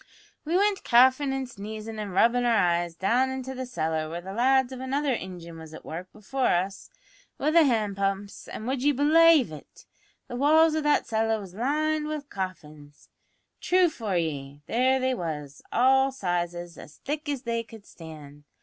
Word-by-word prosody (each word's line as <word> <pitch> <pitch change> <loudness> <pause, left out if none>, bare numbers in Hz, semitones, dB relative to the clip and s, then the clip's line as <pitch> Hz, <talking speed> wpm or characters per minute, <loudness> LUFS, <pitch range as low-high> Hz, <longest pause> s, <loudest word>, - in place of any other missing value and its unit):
We 330 +4 +1
wint 405 0 +1
coughin' 260 +3 +4
and 270 -1 -3
sneezin' 220 0 -7
an' 210 -1 -4
rubbin' 235 +6 +3
our 240 -1 +3
eyes 175 -2 +1
down 235 +9 +1
into 260 0 -5
a 260 -1 -5
cellar, 160 -7 -2
where 170 +2 -5
the 190 +2 -8
lads 260 +3 +3
of 260 - -7
another 270 +1 -1
ingin 175 -4 -8
was 160 -1 -10
at - - -12
work 175 +3 -7
before 250 +5 -2
us 190 +3 -1 0.5
wi' 300 - +1
the 330 -1 +6
hand 215 -6 0
pumps, 195 0 -3
an', 215 - -7
would 260 +1 -2
ye 290 +2 +3
belaive 305 - +5
it? 150 - -13 0.4
but 245 - -9
the 245 - -4
walls 315 +3 +5
o' 315 - 0
that 295 0 +2
cellar 225 0 0
was 190 -3 -10
lined 300 +7 0
wi' 305 -1 -3
coffins! 155 - -8 0.5
True 365 -1 +3
for 215 - -3
ye, 145 -3 -4
there 260 +3 +2
they 260 0 +1
was, 150 - -5
all 265 +2 +4
sizes, 175 -6 -3
as 150 - -13
thick 295 +1 -3
as 275 -3 -3
they 230 -1 -1
could 225 -2 -14
stand. 150 -3 -12
230 Hz, 185 wpm, -26 LUFS, 175-270 Hz, 0.5 s, the